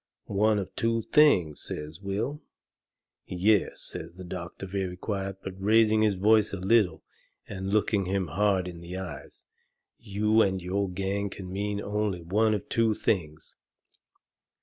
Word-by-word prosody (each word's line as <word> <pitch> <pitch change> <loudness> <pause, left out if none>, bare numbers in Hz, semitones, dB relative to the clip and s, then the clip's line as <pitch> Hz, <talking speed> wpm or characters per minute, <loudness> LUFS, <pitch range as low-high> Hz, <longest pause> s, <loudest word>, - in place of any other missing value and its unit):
"One 105 +2 +2
of 100 -2 -5
two 115 0 0
things?" 95 - +4
says 75 +5 -6
Will. 105 +9 -3 0.9
"Yes," 95 +3 +1
says - - -6
the 95 - -9
doctor, 90 +1 -7
very 95 -1 -3
quiet, 95 -1 -3
but 95 - -5
raising 110 +1 +4
his 105 -2 +3
voice 105 +2 +3
a - - -2
little 95 -3 +2 0.4
and 95 0 -5
looking 105 -2 +2
him 95 +1 0
hard 95 +2 +1
in 85 -2 -8
the 85 +2 -7
eyes. 95 -3 -8 0.5
"You 105 +2 +2
and 95 -2 +2
your 95 +2 -1
gang 100 +2 -2
can 95 -1 -8
mean 100 +1 -2
only 105 -4 -2
one 105 +5 +2
of 105 - -5
two 115 -2 +2
things. 80 -8 -2
100 Hz, 150 wpm, -28 LUFS, 90-105 Hz, 0.9 s, things